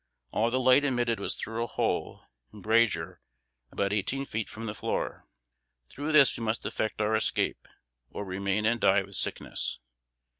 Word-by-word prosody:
All 115 Hz, +2 st, +2 dB
the 125 Hz, -, 0 dB
light 130 Hz, +2 st, +5 dB
admitted 120 Hz, -5 st, +1 dB
was -, -, -1 dB
through 115 Hz, +1 st, -3 dB
a -, -, -3 dB
hole -, -, -2 dB, 0.3 s
(embrasure) 105 Hz, -5 st, +1 dB, 0.5 s
about 100 Hz, 0 st, 0 dB
eighteen 135 Hz, +7 st, -1 dB
feet 110 Hz, -5 st, -3 dB
from 115 Hz, +1 st, -7 dB
the 105 Hz, -, -3 dB
floor. -, -, -3 dB, 0.6 s
Through 145 Hz, +3 st, -4 dB
this 145 Hz, -3 st, +6 dB
we 115 Hz, -, -5 dB
must 110 Hz, 0 st, -1 dB
effect 110 Hz, -, -2 dB
our 105 Hz, +1 st, +2 dB
escape, 110 Hz, -, 0 dB, 0.4 s
or 105 Hz, -, -6 dB
remain 100 Hz, +2 st, -1 dB
and 115 Hz, +1 st, +1 dB
die 95 Hz, 0 st, +4 dB
with 100 Hz, 0 st, -12 dB
sickness. -, -, -3 dB
110 Hz, 160 wpm, -29 LUFS, 100-120 Hz, 0.6 s, this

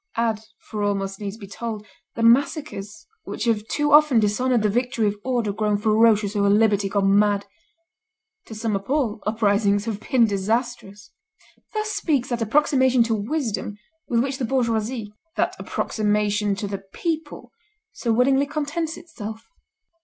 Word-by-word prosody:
Add, 230 Hz, -2 st, +1 dB, 0.2 s
for 215 Hz, -1 st, -7 dB
all 205 Hz, 0 st, +1 dB
must 195 Hz, 0 st, -4 dB
needs 205 Hz, +1 st, -5 dB
be 210 Hz, -, -10 dB
told, 215 Hz, +1 st, -6 dB, 0.3 s
the 230 Hz, -, -2 dB
massacres 230 Hz, -, +1 dB, 0.2 s
which -, -, -5 dB
have 220 Hz, -2 st, 0 dB
too 295 Hz, +3 st, 0 dB
often 295 Hz, -5 st, +6 dB
dishonored 220 Hz, +3 st, +1 dB
the -, -, +4 dB
victory 245 Hz, +1 st, 0 dB
of 205 Hz, 0 st, +1 dB
order 240 Hz, -5 st, -1 dB
grown 210 Hz, 0 st, 0 dB
ferocious 215 Hz, -1 st, +3 dB
over 200 Hz, -1 st, +2 dB
liberty 205 Hz, -1 st, +3 dB
gone 195 Hz, 0 st, +3 dB
mad. 205 Hz, -1 st, +2 dB, 1.0 s
To 220 Hz, -, -8 dB
sum 220 Hz, -1 st, -1 dB
up 195 Hz, +3 st, -5 dB
all, 245 Hz, -7 st, 0 dB
uprisings 205 Hz, -1 st, +2 dB
have 220 Hz, -3 st, -3 dB
been 245 Hz, +1 st, +3 dB
disastrous." 210 Hz, 0 st, -2 dB, 0.6 s
Thus 430 Hz, 0 st, -1 dB
speaks 280 Hz, -, 0 dB
that 240 Hz, -2 st, -2 dB
approximation 260 Hz, +1 st, +3 dB
to 230 Hz, 0 st, -1 dB
wisdom 220 Hz, -2 st, -2 dB, 0.3 s
with 235 Hz, -1 st, +2 dB
which 270 Hz, 0 st, -3 dB
the 255 Hz, -, 0 dB
bourgeoisie, 230 Hz, -3 st, -1 dB, 0.2 s
that -, -, 0 dB
approximation 210 Hz, -1 st, 0 dB
to 205 Hz, +1 st, -4 dB
the 195 Hz, -1 st, -4 dB
people, 310 Hz, -, -5 dB, 0.4 s
so 235 Hz, -, -2 dB
willingly 270 Hz, +4 st, +3 dB
contents 305 Hz, +2 st, -3 dB
itself. 225 Hz, -10 st, -8 dB
220 Hz, 155 wpm, -23 LUFS, 205-255 Hz, 1.0 s, often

